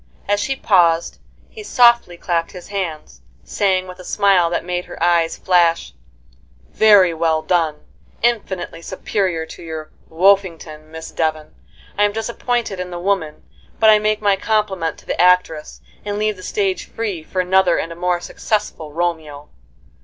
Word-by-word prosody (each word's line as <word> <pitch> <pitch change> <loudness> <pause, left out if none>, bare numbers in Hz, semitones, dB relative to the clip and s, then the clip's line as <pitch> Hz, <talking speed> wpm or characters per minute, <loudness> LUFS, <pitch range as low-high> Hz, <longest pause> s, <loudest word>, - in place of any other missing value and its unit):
As 205 0 +1
she 270 +6 -1
paused, 170 -9 +2 0.3
he 440 - -11
softly 235 - +3
clapped 170 -1 -2
his 180 -2 -11
hands, 165 - -5 0.2
saying, 190 -2 0
with 180 0 -11
a - - -10
smile 190 -3 +3
that 170 0 -2
made 180 0 -3
her - - -10
eyes 170 -1 +2
flash: 170 -2 +2 0.8
"Very 205 -5 +5
well 160 -1 0
done! 160 -4 0 0.4
infinitely 205 -8 -1
superior 185 -2 -2
to - - -12
your 160 -2 -7 0.2
'Woffington,' 165 -4 +1
Miss 160 0 -9
Devon. 155 -1 -2 0.5
I - - +5
am 205 0 +2
disappointed 230 -2 -2
in 180 0 -4
the 175 - -6
woman, 175 -4 -2 0.4
but 220 -1 +6
I 215 - +5
make 215 0 0
my 200 -1 +4
compliment 195 -5 -1
to - - -18
the - - -1
actress, 180 -4 +2 0.2
and 205 0 -3
leave 215 0 0
the 185 - -13
stage 190 -1 -2
free 205 -7 -4
for 185 +4 -5
another 185 -1 +3
and 165 - -3
a - - -7
more 175 0 0
successful 190 -5 -3
Romeo." 155 -3 -3
180 Hz, 160 wpm, -19 LUFS, 165-205 Hz, 0.8 s, but